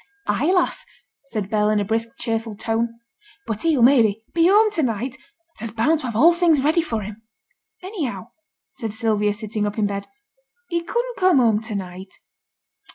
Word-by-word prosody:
'Ay, 250 - +1
lass!' 365 -2 +1 0.4
said 215 -6 -3
Bell, 210 0 +1
in 215 -1 +2
a 205 - -1
brisk, 225 +2 -1
cheerful 225 -2 -3
tone; 230 +2 -2 0.5
'but 220 -2 -4
he'll, 310 -7 +2
maybe, 225 -5 +4
be 335 0 +4
home 425 +3 +5
to 335 - 0
night, 240 -1 -1 0.5
and 230 - -4
I'se 220 - -16
bound 300 +8 +2
to 260 - -5
have 230 - -5
all 325 +10 +6
things 335 -5 +3
ready 315 +4 +3
for 225 -10 -3
him.' 210 +2 -9 0.6
'Anyhow,' 260 - -5 0.4
said 220 -3 -6
Sylvia, 215 -3 +1
sitting 210 0 -3
up 205 - -5
in 215 - +2
bed, 200 0 -3 0.6
'he 340 -1 0
couldn't 480 +7 -3
come 370 -4 +4
home 225 -4 +3
to 220 -1 -5
night.' 190 0 -7
230 Hz, 180 wpm, -22 LUFS, 210-315 Hz, 0.6 s, all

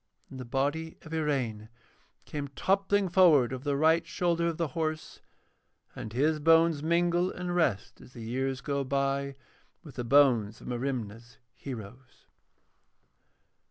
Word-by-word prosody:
Then 130 - -8
the 125 - -6
body 145 +6 -2
of 160 - -10
Iraine 130 -9 -2 0.6
came 145 -1 -5
toppling 195 +7 +1
forward 165 -9 +5
over 130 0 -6
the 145 -1 0
right 160 +3 +4
shoulder 170 0 0
of 165 -2 -2
the 165 -3 -1
horse, 155 +2 -4 0.7
and 110 - -7
his 150 +6 +1
bones 165 0 +4
mingle 175 +2 +1
and 180 0 -4
rest 140 - 0
as 125 - -16
the 115 - -9
years 130 +3 -2
go 140 -1 -2
by 140 0 -1 0.5
with 150 -5 -12
the 125 - -2
bones 120 -5 +3
of - - -14
Merimna's 120 -2 -4 0.2
heroes. 125 0 -10
140 Hz, 140 wpm, -29 LUFS, 125-165 Hz, 0.7 s, forward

